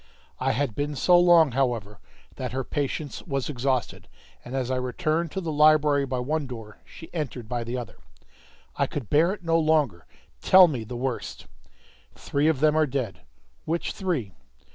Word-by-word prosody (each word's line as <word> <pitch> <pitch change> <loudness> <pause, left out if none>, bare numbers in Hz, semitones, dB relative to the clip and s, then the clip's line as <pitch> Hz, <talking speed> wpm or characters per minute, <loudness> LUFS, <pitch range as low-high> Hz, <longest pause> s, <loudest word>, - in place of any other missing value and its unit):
I - - +1
had 135 -2 -1
been 145 +5 -3
so 180 +6 +4
long, 170 -4 +6
however, 115 -6 -1 0.4
that 125 -2 -5
her 135 0 -2
patience 145 +1 -3
was 135 -5 -3
exhausted, 130 -2 -2 0.4
and 125 - -7
as 130 -1 -2
I 130 - 0
returned 155 +6 -1
to 190 - -3
the 165 -3 -3
library 150 -2 +4
by 130 0 -2
one 145 +4 -2
door, 110 -4 -9
she 165 - -13
entered 135 -8 -4
by 120 0 -3
the 120 +2 -4
other. 120 -5 -7 0.8
"I - - +1
could 135 -8 -6
bear 165 +5 +4
it 205 -2 -7
no 165 0 +2
longer. 150 - +1 0.3
Tell 185 -1 +7
me 130 -8 -3
the 120 +2 -7
worst!" 130 0 -4 0.7
"Three 145 +2 -1
of 155 -4 +1
them 155 0 +4
are 155 -1 +3
dead." 125 -9 -4 0.4
"Which 165 +1 -2
three?" 155 - -3
140 Hz, 175 wpm, -25 LUFS, 125-155 Hz, 0.8 s, Tell